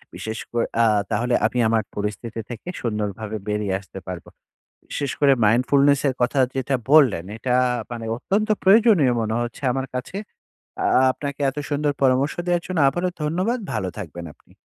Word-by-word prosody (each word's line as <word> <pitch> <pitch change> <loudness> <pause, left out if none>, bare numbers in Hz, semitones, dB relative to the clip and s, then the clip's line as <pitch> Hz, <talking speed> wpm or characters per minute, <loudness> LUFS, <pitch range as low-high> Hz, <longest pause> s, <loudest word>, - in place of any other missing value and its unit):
বিশেষ 110 0 -5
করে 120 -1 0 0.2
আ - - +5 0.3
তাহলে 120 +3 0
আমি 125 - -1
আমার 110 -1 +2
পরিস্থিতি 105 +3 -4
থেকে 120 +5 -8
সুন্দরভাবে 105 -1 -3
বেরিয়ে 105 -2 -1
আসতে 95 0 -11
পারব। 90 -2 -6 0.7
বিশেষ 140 -2 -2
করে 140 -2 +6
mindfulness 135 +5 +4
এর 130 - -1
কথা 125 +3 +1 0.2
যেটা 135 +1 -1 0.2
বললেন, 135 - +5
এটা 125 +3 -2 0.4
মানে 120 -1 -5
অত্যন্ত 205 - -1
প্রয়োজনীয় 195 - +5
মনে 110 0 -1
হচ্ছে 120 +4 -6
আমার 135 +1 -2
কাছে। 125 +9 -5 0.6
য়া 130 - +3
আপনাকে 140 0 -6
এত 135 - -9
সুন্দর 145 0 +1
পরামর্শ 135 +2 +3
দেওয়ার 175 -1 +1
জন্য 185 -2 -3
আবারো 175 +7 -1
ধন্যবাদ। 185 +11 0
ভালো 95 - -2
থাকবেন 85 -3 -7
আপনি। - - -26
125 Hz, 160 wpm, -22 LUFS, 110-145 Hz, 0.7 s, করে